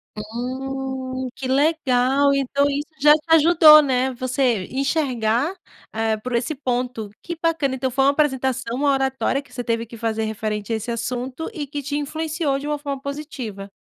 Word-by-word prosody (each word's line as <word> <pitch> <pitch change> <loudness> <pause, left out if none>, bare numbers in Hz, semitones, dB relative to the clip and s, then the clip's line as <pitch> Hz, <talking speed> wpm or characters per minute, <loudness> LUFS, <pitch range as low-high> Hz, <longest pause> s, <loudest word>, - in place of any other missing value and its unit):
Hum, 260 +3 -4
que 265 - -5
legal. 275 -1 +2
Então 275 +1 +1
isso 285 +1 -2
já 295 +1 +8
te 305 0 0
ajudou, 310 -1 +8
né. 260 -1 0
Você 250 -5 0
enxergar 265 0 0 0.4
é 220 0 0
por 245 +3 -4
esse 255 +6 -1
ponto 245 -4 -2
que 340 -1 -6
bacana. 315 -5 +1
Então 260 0 -2
foi 270 +2 +2
uma 280 - +6
apresentação, 265 -4 0
uma 285 +1 +2
oratória 270 0 0
que 250 -3 -21
você 245 -1 -4
teve 230 -1 -1
que 230 +1 -11
fazer 225 -1 -1
referente 215 0 -3
a - - +2
esse 225 +2 -4
assunto 250 - -4
e 295 -7 -5
que 290 0 -5
te 290 +2 -2
influenciou 310 0 -2
de 290 - -6
uma 295 - -1
forma 280 -2 -5
positiva. 260 -9 -6
265 Hz, 175 wpm, -22 LUFS, 240-285 Hz, 0.4 s, já